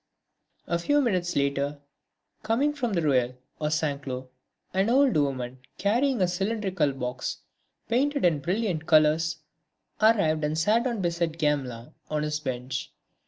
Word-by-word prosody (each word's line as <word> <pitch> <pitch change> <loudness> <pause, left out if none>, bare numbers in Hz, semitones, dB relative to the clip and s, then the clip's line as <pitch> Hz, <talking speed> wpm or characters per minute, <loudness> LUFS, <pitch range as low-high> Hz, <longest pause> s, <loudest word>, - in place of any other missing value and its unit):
A 170 0 0
few 290 +12 +2
minutes 185 -10 0
later, 140 +1 0 0.6
coming 245 +7 +1
from 245 -7 -2
Rueil 130 -8 +2 0.2
or 150 - 0
Saint 150 -2 -1
Cloud, 130 -1 -6 0.4
an 190 +3 +2
old 270 +1 +4
woman 130 -4 -1 0.2
carrying 235 +3 +2
a - - +3
cylindrical 190 -4 0
box, 125 -1 -4 0.5
painted 280 +3 +1
in 165 -4 +3
brilliant 175 0 -1
colours, 155 0 +4 0.6
arrived 200 -9 +4
and 150 +1 0
sat 215 +9 +3
down 235 -5 -1
beside 170 -1 -1
Gamelin, 135 -7 -1 0.2
on 150 -1 -1
his 150 0 -1
bench. 130 -2 -4
160 Hz, 135 wpm, -27 LUFS, 140-215 Hz, 0.6 s, old